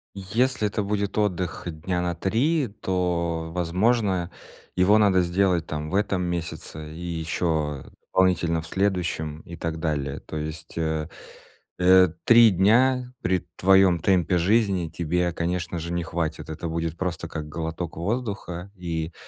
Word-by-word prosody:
Если 110 +4 0
это 105 - -2
будет 100 0 -2
отдых 90 -5 -1
дня 90 +2 -2
на 90 -1 -1
3, 130 - +1
то, 85 -3 -1
возможно, 90 +1 +1 0.4
его 95 +4 +5
надо 100 -4 +4
сделать 90 -1 +1
там 75 0 -4
в - - -1
этом 100 -2 +1
месяце 80 -3 -5
и - - -9
ещё, 80 -4 -2
э, - - -14 0.2
дополнительно 85 -3 +2
в 80 - -10
следующем 85 -5 -1
и 85 - -8
так 80 0 -4
далее. 75 -4 -2
То 80 - -7
есть, 75 +1 -6
э, 80 -1 -1 0.7
э, 95 0 +6 0.2
3 115 -1 +8
дня 125 +7 +3
при 90 -1 0
твоём 95 -2 +5
темпе 90 0 +2
жизни 95 -2 +2
тебе, 85 +2 -1
конечно 85 0 -2
же, 85 +2 -4
не 85 0 -1
хватит. 80 -2 -3
Это 80 +2 -5
будет 80 0 -3
просто 85 -2 -3
как 80 -2 -6
глоток 80 +2 -4
воздуха, 100 -2 -3
и, 85 -2 -4
90 Hz, 145 wpm, -25 LUFS, 80-95 Hz, 0.7 s, 3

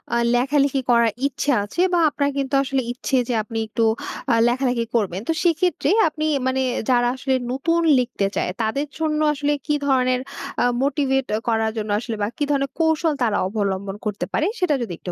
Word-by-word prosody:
আ - - +3 0.2
লেখালেখি 275 +1 +2
করার 235 -1 +5 0.2
ইচ্ছা 285 +1 -1
আছে 275 +12 -3
বা 345 - +4
আপনার 285 -1 -1
কিন্তু 275 0 -2
আসলে 270 0 -1
ইচ্ছে 260 +1 -1
যে - - +1
আপনি 225 +1 -7
একটু 225 +1 -1 0.5
আ - - +4
লেখালেখি 245 -1 0
করবেন 195 -4 0
তো 325 - +2
সেক্ষেত্রে 340 -3 +1 0.2
আপনি 310 0 -3 0.2
মানে 265 0 0 0.3
যারা 245 -1 +3
আসলে 265 0 0 0.2
নতুন 330 +6 +1 0.2
লিখতে 240 -5 -1
চায়। - - 0
তাদের 275 +7 -1
জন্য 310 -1 0
আসলে 290 +1 0
কী 300 -1 +1
ধরনের 255 -2 +2 0.4
আ - - +3 0.2
মোটিভেট 270 -2 +1 0.2
করার 225 -1 +1
জন্য 215 -1 -3
আসলে 230 -1 -4
বা 205 - +1
কি 295 - -1
ধরনের 275 -1 0
কৌশল 320 -1 +2
তারা 220 -3 +1
অবলম্বন 200 -1 -2
করতে 210 -1 -2
পারে 310 - +1
সেটা 355 -6 +2
যদি 215 -7 -4
একটু 180 - -6
265 Hz, 185 wpm, -22 LUFS, 230-290 Hz, 0.5 s, করার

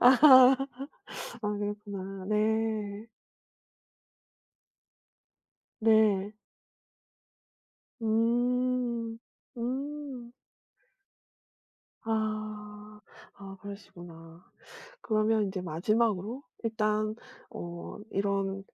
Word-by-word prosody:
아 260 0 +9 0.9
아 210 - 0
그렇구나. 200 -2 -5
네. 215 0 0 2.7
네. 215 -3 +4 1.7
음 235 +1 +1 0.4
음. 265 0 -4 1.7
아 215 -1 -4 0.3
아 195 -1 -10
그러시구나. 175 -4 -11 0.6
그러면 215 - +2
인제 190 -1 -3
마지막으로 215 - 0 0.2
일단 215 -1 0 0.3
어 170 0 -7
이런 195 0 -1
215 Hz, 105 characters per minute, -30 LUFS, 200-230 Hz, 2.7 s, 아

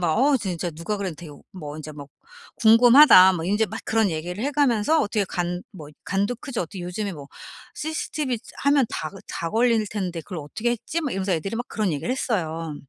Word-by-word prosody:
막 165 -3 +1
"어 280 +2 +4
진짜 180 -4 -3
누가 170 +7 -4
그래도 190 -5 -3
되오 150 -5 -12
뭐 150 -5 -8
인제 155 0 -8
뭐 145 -1 -10 0.5
궁금하다." 230 -4 +8
뭐 165 -1 -4
인제 210 +4 +1
막 - - -7
그런 220 -2 +2
얘기를 175 +6 -4
해 285 - 0
가면서 280 +1 +2
"어떻게 205 -1 0
간 175 0 -3
뭐 155 -6 -10 0.2
간도 200 +5 -1
크지. 255 -1 -7
어떻게 180 +2 -6
요즘에 190 +3 -4
뭐 145 -3 -10 0.5
CCTV 305 -4 -3
이제 220 - -14
하면 280 -3 +4
다 155 - -4
걸 195 - -12
다 165 0 -4
걸릴 230 -1 +2
텐데 180 -5 -3
그걸 180 -5 -7
어떻게 215 +11 -3
했지?" 295 +8 -3
막 285 - -2
이러면서 190 0 -1
애들이 195 +7 -2
막 245 - -4
그런 210 -6 -1
얘기를 145 - -3
했어요. 165 - -2
195 Hz, 405 characters per minute, -24 LUFS, 170-235 Hz, 0.5 s, 궁금하다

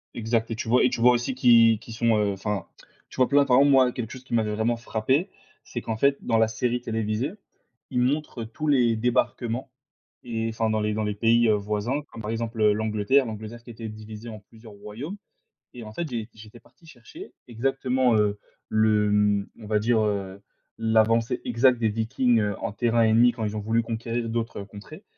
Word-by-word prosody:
Exact 115 0 -1
et 115 - -3
tu 115 - -5
vois 125 +2 +4
et 130 - +4
tu 115 - -4
vois? 125 +1 +7
Aussi 120 +2 -1
qui 115 -3 +5
qui 115 - -12
sont, 115 -1 +2
heu, 105 -1 +1
enfin 100 -1 -3
te - - -18 0.3
tu - - -12
vois? 130 - +4
Plein. 140 0 +4
Par 125 -2 +4
exemple 140 +1 +5
moi 130 -2 +5
quelque 120 -2 -6
chose 130 0 -10
qui 130 - -9
m'avait 105 -2 +1
vraiment 115 +2 0
frappé, 120 - -1 0.3
c'est 120 - -6
qu'en 110 -1 -4
fait 140 +3 +3
dans 115 - +1
la 110 - +4
série 120 +2 -2
télévisée, 115 +4 -2 0.6
ils 125 - 0
montrent, 135 0 -1
heu, - - -6
tous 155 +7 -5
les 120 -5 +3
débarquements 120 +2 -1 0.5
et 115 -2 -3
enfin 110 0 -1
dans 110 0 0
les 105 0 -1
dans 110 - -1
les 105 0 -1
pays, 115 +2 +3
heu, 110 - +4
voisins 105 +7 -2
comme 115 - -9
par 105 - -3
exemple, 115 0 -4
heu, 105 -1 +5
l'Angleterre 110 +5 +1
L'Angleterre 110 +1 -7
qui 120 - -14
était 115 -1 -7
divisée 110 +1 -9
en 110 -1 -8
plusieurs 110 +1 -16
royaumes, 115 - -8 0.6
et 120 -2 -9
en 110 - -9
fait 170 +4 -3
j'ai 115 -4 -5
j'étais 110 +2 -14
parti 165 - -25
chercher 160 - -12 0.2
exactement, 130 0 0
heu, 105 -1 +1 0.3
le, 110 -1 +2
hem, 105 -1 +2
on 110 - -11
va 105 -1 +1
dire, 115 +1 +2
heu, 100 -2 -2 0.4
l'avancée 115 +1 +2
exacte 125 +1 +3
des 110 -2 +1
Vikings, 115 +2 +1
heu, 105 -2 -1
en 115 -3 -3
terrain 120 0 +1
ennemi 115 +2 +5
quand 115 -1 -6
ils 105 0 -3
ont - - -1
voulu 115 +2 +1
conquérir 115 +1 -4
d'autres 115 -2 -3
contrées, 105 - -12
115 Hz, 215 wpm, -25 LUFS, 110-125 Hz, 0.6 s, vois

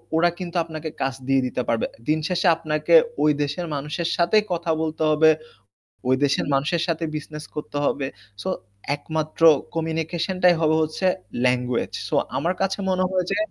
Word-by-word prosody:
ওরা 175 +2 +4
কিন্তু 180 -1 -6
আপনাকে 160 -1 -6
কাজ 135 -1 0
দিয়ে 135 -1 +3
দিতে 125 - -2
পারবে। 115 -1 +1 0.2
দিন 155 +1 +2
শেষে 180 0 +1
আপনাকে 155 - -1 0.3
ওই 150 - +5
দেশের 145 +5 -3
মানুষের 150 +4 -3
সাথেই 195 +5 +4
কথা 170 -1 -1
বলতে 160 0 -2
হবে, 155 +1 +5 0.8
ওই 130 - +4
দেশের 145 0 +2
মানুষের 155 +5 +1
সাথেই 165 -1 -1
বিজনেস 150 0 -6
করতে 150 -1 -5
হবে। 135 -1 0 0.4
সো, - - -2 0.5
একমাত্র 155 +2 -4 0.3
কমিউনিকেশন 165 +3 -2
টাই 180 -1 +7
হবে 155 0 +3
হচ্ছে 155 +5 -3 0.4
ল্যাঙ্গুয়েজ। 125 -1 +1 0.2
সো - - -1 0.2
আমার 170 +6 0
কাছে 195 +1 0
মনে 185 0 +2
হয় 185 -2 0
যে - - +1
160 Hz, 165 wpm, -23 LUFS, 150-170 Hz, 0.8 s, টাই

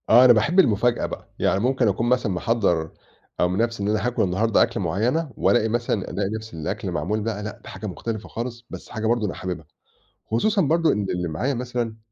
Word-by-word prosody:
آه، 120 +3 +8
أنا 125 - +9
باحب 165 - +2
المفاجأة 120 - +3
بقى، - - -7
يعني 95 - +2
ممكن 125 +1 +2
أكون 115 +4 +1
مثلًا 125 -4 +2
محضَّر 90 -5 0 0.5
أو 90 - +4
من 90 +1 -2
نَفسي 115 -2 0
إن - - 0
أنا 110 +3 +1
هاكل 125 - +1
النهاردة 105 +4 +3
أكلة - - -2
معيّنة 120 - 0
وألاقي 110 -2 +3
مثلًا 115 -3 -1
ألاقي 95 +1 -1
نَفس 110 -1 -6
الأكل 80 -2 -4
معمول 105 +3 -1
بقى، 105 -1 -3
لأ 105 0 -7
ده - - -10
حاجة 110 - -6
مختلفة 110 +3 -5
خالص، 120 0 -5
بس - - -9
حاجة 110 -2 -4
برضه 115 -1 +2
أنا 95 - -2
حاببها، 90 -3 -5 0.7
خصوصًا 195 - +2
برضه 165 +2 +3
إن 105 -1 -1
اللي 90 -1 -2
معايا 120 - -1
مثلًا 120 -2 -3
110 Hz, 210 wpm, -23 LUFS, 100-120 Hz, 0.7 s, أنا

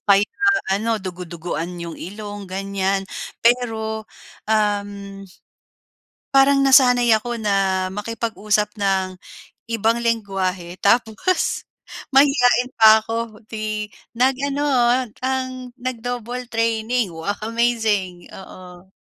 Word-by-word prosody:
kahit 200 +1 +5
na 400 0 -2 0.3
ano, 230 - -1
dugu-duguan 175 -1 -5
yung 170 -1 -6
ilong, 205 +1 -7
ganyan. 195 0 -1 0.4
Pero, 220 -2 +1 0.4
uhm, 200 -2 -1 1.1
parang 275 0 +5
nasanay 250 -3 +5
ako 240 +1 -4
na 195 -2 +1
makipag-usap 215 0 -1
ng 190 -2 0 0.5
ibang 230 +1 +1
lengguwahe 195 -6 -2
tapos 230 - +1 0.5
mahiyain 250 -3 +4
pa 220 0 +8
ako 225 -1 -5
'di 215 -1 -4 0.3
nag-ano 275 +3 +1
ag 245 -2 +2
ang 255 -1 -3
nag-double 245 0 -4
training. 225 -2 0
Wow, 165 +5 -2 0.2
amazing. 220 -6 0
Oo. 185 -1 -12
220 Hz, 95 wpm, -21 LUFS, 195-245 Hz, 1.1 s, pa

